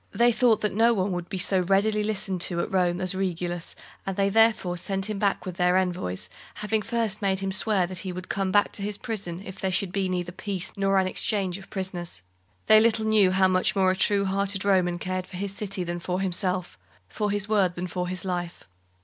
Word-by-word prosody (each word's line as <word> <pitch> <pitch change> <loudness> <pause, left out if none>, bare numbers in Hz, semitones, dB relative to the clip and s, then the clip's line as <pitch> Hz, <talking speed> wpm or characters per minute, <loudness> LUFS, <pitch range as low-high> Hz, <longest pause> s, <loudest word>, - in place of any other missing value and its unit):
They 235 +4 +4
thought 235 -2 +3
that 210 - 0
no 230 +3 +4
one 190 0 0
would 175 -1 -4
be 190 - -3
so 190 +1 +3
readily 200 +4 +2
listened 195 -4 -2
to 170 -1 0
at - - -4
Rome 180 -2 +1
as 185 0 -1
Regulus, 175 -2 -2 0.3
and 195 -1 -4
they 200 0 +2
therefore 220 -4 +3
sent 190 +2 -2
him 210 -2 -3
there 200 -1 +2
with 185 -1 -6
their 180 0 +3
envoys, 175 - -1 0.3
having 215 +1 -1
first 225 -2 -1
made 195 -1 0
him 195 0 -1
swear 200 -1 +1
that 180 0 -6
he 190 - -4
would 185 +1 -7
come 195 -1 -1
back 205 +1 +3
to - - -9
his 205 0 -3
prison, 195 -7 -4
if 190 0 -9
there 190 - -1
should 190 0 -1
neither 185 -3 -1
be - - -24
peace 190 -3 -2
nor 195 0 +2
an 190 - +3
exchange 190 0 0
of 195 - -14
prisoners. 180 - -4 0.4
They 215 - +7
little 220 0 +2
knew 215 -3 +4
how 190 0 +4
much 185 +2 +2
more 190 -1 +4
a - - 0
true 200 +1 +3
hearted 195 0 -1
Roman 180 -3 +2
cared 185 +1 -3
for 185 - -9
his 195 +1 -3
city 195 -3 -2
than 175 0 -4
for 180 +1 -2
himself 185 - -2 0.3
for 210 - -2
his 205 0 0
word 195 -5 +2
than 175 - -3
for 180 0 -3
his 185 +1 -5
life. 175 -2 -4
190 Hz, 225 wpm, -26 LUFS, 180-205 Hz, 0.4 s, They